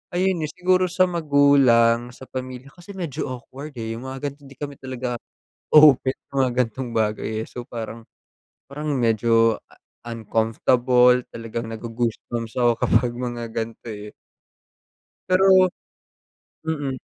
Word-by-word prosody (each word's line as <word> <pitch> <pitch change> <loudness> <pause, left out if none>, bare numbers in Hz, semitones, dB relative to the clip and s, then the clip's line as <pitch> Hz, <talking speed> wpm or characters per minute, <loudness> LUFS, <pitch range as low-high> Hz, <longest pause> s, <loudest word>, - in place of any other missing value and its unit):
ayun 185 0 +1
eh, 150 - -6
siguro 185 0 +2
sa 180 +1 +2
magulang, 135 -7 +4
sa - - -13
pamilya 130 +1 -6
kasi 175 +3 -12
medyo 170 -8 -4
awkward 130 +4 -8
eh, 115 -2 -4
yung 125 +3 -8
mga 130 +1 -7
gan'tong 140 0 -16
di 140 - -14
kami 145 -1 -6
talaga 130 -2 -4 0.6
open 145 -4 +7 0.2
sa - - -46
mga 125 - -1
gan'tong 120 +2 -6
bagay 110 0 -1
eh, - - -8
so 125 - -8
parang 115 0 -7 0.7
parang 150 +2 -6
medyo 115 -2 +3 0.5
uncomfortable 120 +2 +2
talagang 115 0 -5
nago-goosebumps 115 0 -4
ako 120 -1 +5
kapag 125 -2 +2
mga 120 -1 -4
gan'to 115 +1 -5
eh. 105 0 -9 1.2
Pero 185 0 +6 1.0
mm. 145 -4 -2
125 Hz, 130 wpm, -23 LUFS, 115-145 Hz, 1.2 s, open